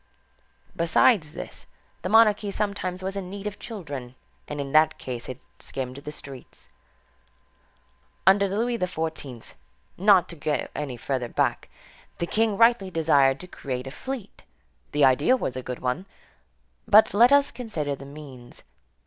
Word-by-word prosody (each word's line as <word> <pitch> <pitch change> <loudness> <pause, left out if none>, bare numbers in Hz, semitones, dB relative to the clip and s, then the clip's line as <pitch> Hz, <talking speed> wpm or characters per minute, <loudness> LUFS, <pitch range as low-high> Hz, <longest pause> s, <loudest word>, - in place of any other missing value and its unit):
Besides 170 -1 +3
this, - - -8 0.3
the 185 - -3
monarchy 215 -1 +5
sometimes 195 -2 -3
was 190 +1 -3
in 190 -2 -5
need 200 +1 -7
of 205 -1 -5
children, 145 - -7 0.3
and 150 - -5
in 140 -1 -4
that 155 +1 +4
case 125 -1 -6
it 130 +1 -6 0.2
skimmed 130 -1 -5
the 145 +1 -7
streets. 135 - -11 1.6
Under 200 +2 +5
Louis 230 +4 -1
XIV., 160 -8 -4 0.5
not 190 -2 +5
to 170 - -7
go 150 -1 -2
any 140 -5 -4
further 125 0 -2
back, - - -1 0.5
the 170 - -1
king 215 +2 +1
rightly 230 -4 +4
desired 145 -6 +3
to 180 - -9
create 130 -6 -5
a 135 - -6
fleet. 255 - -7 0.5
The 145 -1 +4
idea 145 - +4
was 130 - -3
a 130 - -4
good 125 0 -5
one. 130 +10 -2 0.8
But 215 +1 +6
let 235 +5 +6
us 285 0 +5
consider 165 - -3
the 140 - -11
means. 140 -4 -12
165 Hz, 150 wpm, -25 LUFS, 135-205 Hz, 1.6 s, But